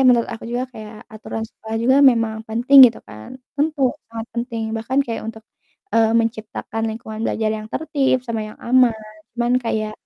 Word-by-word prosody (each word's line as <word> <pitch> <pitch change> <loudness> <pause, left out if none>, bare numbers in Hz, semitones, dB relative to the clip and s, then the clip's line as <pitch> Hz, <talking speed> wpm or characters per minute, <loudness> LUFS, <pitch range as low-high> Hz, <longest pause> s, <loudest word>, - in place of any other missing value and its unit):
menurut 240 -2 +4
aku 230 - -7
juga 245 +1 -1
kayak 215 -1 -10
aturan 220 0 -6
sekolah 220 -1 -7
juga 260 +3 +4
memang 230 -5 +4
penting, 255 +4 +8
gitu 230 - -3
kan, 110 - -11 0.2
tentu 300 -1 0 0.3
sangat 230 0 -6
penting, 235 -1 -3
bahkan 255 +5 -2
kayak 230 - -4
untuk, 220 -1 -7 0.5
eee, 225 -1 +4
menciptakan 225 -1 -2
lingkungan 220 -1 -7
belajar 220 -1 -1
yang 215 0 -4
tertib 275 -5 +1
sama 225 -1 -2
yang 215 - -12
aman. 250 -1 +4 0.4
Cuman 240 +1 +1
kayak, 215 -3 -2
230 Hz, 165 wpm, -20 LUFS, 220-250 Hz, 0.5 s, penting